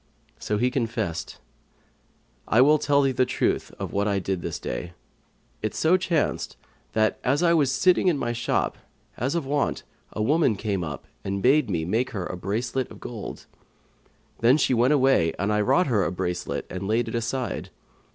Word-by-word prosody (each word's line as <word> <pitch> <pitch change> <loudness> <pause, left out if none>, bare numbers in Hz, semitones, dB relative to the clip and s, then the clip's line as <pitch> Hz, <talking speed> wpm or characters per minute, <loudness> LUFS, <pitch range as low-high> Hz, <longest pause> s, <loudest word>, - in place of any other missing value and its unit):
So 105 - -1
he 125 +4 +1
confessed, 110 -9 -3 1.1
"I 110 - +3
will 150 +4 +6
tell 140 0 +3
thee 135 - +2
the 130 0 +2
truth - - -1
of - - -5
what 100 +1 +1
I 100 -1 +1
did 95 -1 -2
this - - -4
day. 85 +8 -5 0.7
It 110 - -3
so 160 +3 +4
chanced 175 -4 -1 0.4
that, 110 0 +1
as 140 +6 +2
I 170 -1 +5
was 145 -5 +3
sitting 180 +6 +3
in 170 -5 +3
my 120 -3 -2
shop, 120 0 -1 0.4
as 130 +7 -1
of 165 -4 -1
wont, 145 +1 -1 0.3
a 105 - -2
woman 145 -2 +3
came 100 -3 -2
up 75 -4 -6
to - - -28
me - - -35 0.2
and 100 - -4
bade 135 -1 +4
me 80 -4 -1
make 115 +8 0
her 90 - -2
a - - -5
bracelet 115 +8 -2
of - - -12
gold. 115 -4 -7 0.9
Then 120 +5 +5
she 135 - +2
went 125 +3 +3
away 130 - +3
and 100 +3 0
I 105 - +2
wrought 180 - +3
her 110 - +2
a 85 - -1
bracelet 90 0 -3
and 95 +1 -5
laid 115 +3 +1
it - - -5
aside. 120 +2 -3
120 Hz, 190 wpm, -25 LUFS, 100-135 Hz, 1.1 s, will